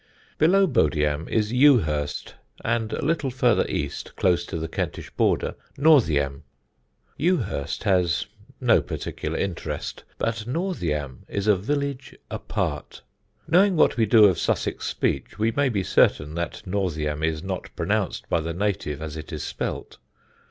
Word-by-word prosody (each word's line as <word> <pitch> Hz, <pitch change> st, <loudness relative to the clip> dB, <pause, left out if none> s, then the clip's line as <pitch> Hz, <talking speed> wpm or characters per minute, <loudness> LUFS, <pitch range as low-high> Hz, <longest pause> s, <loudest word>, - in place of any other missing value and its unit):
Below 195 Hz, +5 st, +5 dB
Bodiam 75 Hz, -, +1 dB
is 110 Hz, 0 st, 0 dB
Ewhurst, 90 Hz, -, +3 dB, 0.3 s
and 115 Hz, -1 st, 0 dB
a -, -, -3 dB
little 155 Hz, -3 st, +1 dB
farther 125 Hz, -2 st, +2 dB
east, -, -, -4 dB
close 85 Hz, -2 st, +1 dB
to -, -, -4 dB
the 80 Hz, 0 st, -3 dB
Kentish -, -, -4 dB
border, -, -, +1 dB, 0.2 s
Northiam. 80 Hz, -, +3 dB, 0.8 s
Ewhurst 135 Hz, -, 0 dB
has 90 Hz, -4 st, +2 dB, 0.3 s
no -, -, +4 dB
particular -, -, -4 dB
interest, 95 Hz, -4 st, -4 dB
but 115 Hz, -1 st, -2 dB
Northiam 85 Hz, -, -2 dB
is 100 Hz, -1 st, -3 dB
a 105 Hz, -1 st, +5 dB
village 140 Hz, +6 st, -3 dB, 0.2 s
apart. -, -, -3 dB, 0.4 s
Knowing 190 Hz, +3 st, +4 dB
what 155 Hz, -, +4 dB
we 115 Hz, -3 st, +2 dB
do 110 Hz, 0 st, +7 dB
of 95 Hz, -4 st, +3 dB
Sussex -, -, -1 dB
speech -, -, -2 dB
we 110 Hz, +2 st, +1 dB
may 140 Hz, +3 st, +1 dB
be 100 Hz, -5 st, -1 dB
certain 75 Hz, -3 st, +2 dB
that 85 Hz, +1 st, -4 dB
Northiam 80 Hz, -6 st, -2 dB
is 80 Hz, 0 st, -1 dB
not 95 Hz, -2 st, -4 dB
pronounced 100 Hz, +3 st, -1 dB
by 85 Hz, -, +1 dB
the 85 Hz, +1 st, -4 dB
native 85 Hz, -6 st, -2 dB
as 80 Hz, -1 st, -5 dB
it 80 Hz, -1 st, -8 dB
is 75 Hz, -2 st, -4 dB
spelt. -, -, -5 dB
100 Hz, 145 wpm, -24 LUFS, 80-125 Hz, 0.8 s, do